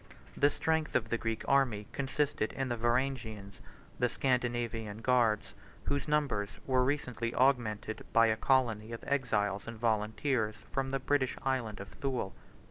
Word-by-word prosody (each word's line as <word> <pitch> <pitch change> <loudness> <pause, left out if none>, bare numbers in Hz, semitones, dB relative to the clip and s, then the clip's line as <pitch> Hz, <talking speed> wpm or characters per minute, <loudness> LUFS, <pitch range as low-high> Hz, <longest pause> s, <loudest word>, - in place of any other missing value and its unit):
The 145 - +4
strength 160 +1 -1
of 115 -2 +1
the 120 - +1
Greek 115 -1 -3
army 125 -7 +2
consisted 140 -4 -1
in 135 -1 -2
the 120 - 0
Varangians, 120 -5 -1 0.4
the 125 - +3
Scandinavian 120 -4 -1
guards, 120 -4 +2 0.3
whose 140 +1 -1
numbers 145 -9 +1 0.2
were 130 -1 +3
recently 125 -4 -1
augmented 115 -5 +1
by 115 0 +6
a 110 -1 +3
colony 115 -3 +1
of 115 - -7
exiles 105 -8 0
and 115 -1 -6
volunteers 110 +1 0 0.2
from 135 0 -1
the 135 - 0
British 135 0 +1
Island 130 -6 -1
of 100 -1 -7
Thule. 130 -9 -3
120 Hz, 145 wpm, -32 LUFS, 110-135 Hz, 0.4 s, by